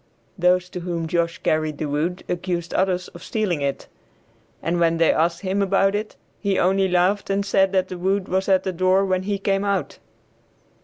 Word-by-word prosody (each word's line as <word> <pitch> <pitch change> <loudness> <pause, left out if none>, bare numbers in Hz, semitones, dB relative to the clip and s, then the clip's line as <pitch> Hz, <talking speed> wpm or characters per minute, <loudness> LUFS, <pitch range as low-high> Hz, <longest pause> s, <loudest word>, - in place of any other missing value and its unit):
Those 180 0 +2
to 180 - -5
whom 170 -2 -3
Josh 170 0 0
carried 155 -1 -1
the 155 - -3
wood 155 +5 -2
accused 175 -1 -3
others 185 -1 0
of 175 - -13
stealing 190 -8 -1
it, 140 -1 -2 0.8
and 170 +1 0
when 165 -1 +2
they 165 0 +4
asked 170 +1 0
him 195 +1 -1
about 195 0 +2
it, 210 +1 -3 0.2
he 200 -2 0
only 190 +1 +3
laughed 185 +3 +1
and 200 0 0
said 195 -1 +3
that 185 -1 +2
the 180 - -7
wood 190 +1 0
was 190 +2 -1
at 190 -1 +4
the 190 - -2
door 185 +2 +3
when 185 -1 0
he 200 +1 -2
came 195 0 0
out. 200 -1 -2
185 Hz, 195 wpm, -22 LUFS, 170-195 Hz, 0.8 s, they